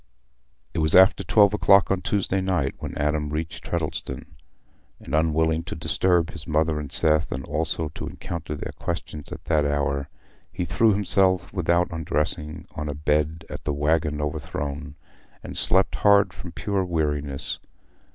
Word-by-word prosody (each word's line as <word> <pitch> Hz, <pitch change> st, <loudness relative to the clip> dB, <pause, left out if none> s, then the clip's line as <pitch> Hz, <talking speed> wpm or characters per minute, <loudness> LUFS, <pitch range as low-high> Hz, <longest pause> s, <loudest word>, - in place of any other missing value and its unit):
It -, -, -2 dB
was 80 Hz, 0 st, +3 dB
after 95 Hz, +1 st, +6 dB
twelve 100 Hz, +2 st, +4 dB
o'clock 100 Hz, -2 st, +5 dB
on 95 Hz, -1 st, +1 dB
Tuesday 95 Hz, 0 st, 0 dB
night 90 Hz, -8 st, 0 dB
when -, -, -6 dB
Adam 75 Hz, 0 st, 0 dB
reached 80 Hz, +2 st, -4 dB
Treddleston; 80 Hz, -5 st, -4 dB, 0.7 s
and, -, -, -10 dB
unwilling 80 Hz, +1 st, +2 dB
to -, -, -5 dB
disturb 90 Hz, -2 st, +1 dB
his 75 Hz, -, -8 dB
mother 80 Hz, 0 st, +1 dB
and 70 Hz, -2 st, -7 dB
Seth, 80 Hz, +1 st, +4 dB
and 65 Hz, 0 st, -4 dB
also 80 Hz, 0 st, -1 dB
to -, -, -7 dB
encounter 85 Hz, -3 st, -6 dB
their -, -, -6 dB
questions 75 Hz, -1 st, -6 dB
at -, -, -8 dB
that 80 Hz, -2 st, +2 dB
hour, 70 Hz, -1 st, -1 dB, 0.4 s
he 90 Hz, -, -3 dB
threw 110 Hz, +6 st, +3 dB
himself 95 Hz, -3 st, +2 dB
without 85 Hz, -1 st, +1 dB
undressing 75 Hz, -1 st, -2 dB
on 75 Hz, 0 st, -4 dB
a 75 Hz, -, -3 dB
bed 75 Hz, +2 st, 0 dB
at -, -, -8 dB
the 75 Hz, -, -1 dB
"Waggon 75 Hz, +1 st, +1 dB
Overthrown," 75 Hz, -1 st, -4 dB, 0.5 s
and -, -, -8 dB
slept 95 Hz, +1 st, +2 dB
hard 100 Hz, -1 st, +4 dB
from 85 Hz, -, -9 dB
pure 100 Hz, +3 st, -1 dB
weariness. 75 Hz, -5 st, -1 dB
80 Hz, 155 wpm, -24 LUFS, 75-90 Hz, 0.7 s, after